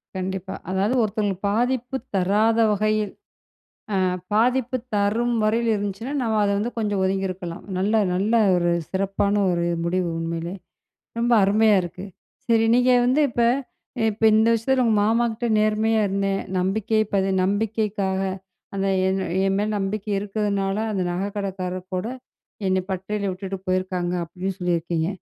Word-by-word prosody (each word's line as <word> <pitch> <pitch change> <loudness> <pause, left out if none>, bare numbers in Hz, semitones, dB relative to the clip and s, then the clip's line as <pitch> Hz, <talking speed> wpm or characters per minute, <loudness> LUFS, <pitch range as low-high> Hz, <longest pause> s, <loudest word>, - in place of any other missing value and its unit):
கண்டிப்பா. 190 0 -4
அதாவது, 195 +6 +1
ஒருத்தவங்களுக்கு 205 -3 -1
பாதிப்பு 245 +3 0 0.2
தராத 210 +5 +2
வகையில் 215 0 0 0.9
அ, - - +2 0.3
பாதிப்பு 250 +3 +2 0.2
தரும் 220 +4 +1
வகையில் 225 +2 +2
இருந்துச்சுனா, 205 +6 -4
நம்ம 220 -2 0
அத 200 - +2
வந்து 230 +4 -2
கொஞ்ச 210 -2 -1
ஒதுங்கியிருக்கலாம். 190 -2 -2
நல்ல, 200 +4 +1 0.2
நல்ல 200 +5 0 0.2
ஒரு 175 0 +1 0.2
சிறப்பான 195 +1 0 0.2
ஒரு 170 -1 0 0.2
முடிவு, 180 +1 0
உண்மையிலே. 165 +2 -3 0.7
ரொம்ப 240 +1 +1
அருமையா 215 +2 +4
இருக்கு. 180 +2 -7 0.4
சரி, 225 -1 +4
நீங்க 250 +1 +4
வந்து 260 +5 +3
இப்ப, 240 - -1 0.7
இப்ப 215 +2 -8
இந்த 220 +1 +4
விஷயத்தில, 255 +3 +1
உங்க 225 -2 +3
மாமா 230 +2 +2
கிட்ட 240 +2 -3
நேர்மையா 215 +1 +2
இருந்தேன். 195 0 0 0.2
நம்பிக்கை 215 +4 +1
பது 195 0 +2
நம்பிக்கைக்காக 205 -1 0 0.5
அந்த 195 0 0 0.2
என் 190 +1 0
அ - - -4 0.2
என் 195 0 +1
மேல 205 +1 0
நம்பிக்கை 200 +2 -3
இருக்கிறதுனால, 200 -1 -1 0.2
அந்த 195 -3 -1
நகைக்கடைக்காரர் 185 -1 -4
கூட, 185 - -2 0.6
என்னை 185 0 +2
பட்டறைல 200 +2 -2
விட்டுட்டு 195 +1 -5
போயிருக்காங்க. 185 -1 -1
அப்படீன்னு 185 +3 -5
சொல்லியிருக்கீங்க. 170 -2 0
200 Hz, 135 wpm, -23 LUFS, 190-220 Hz, 0.9 s, அருமையா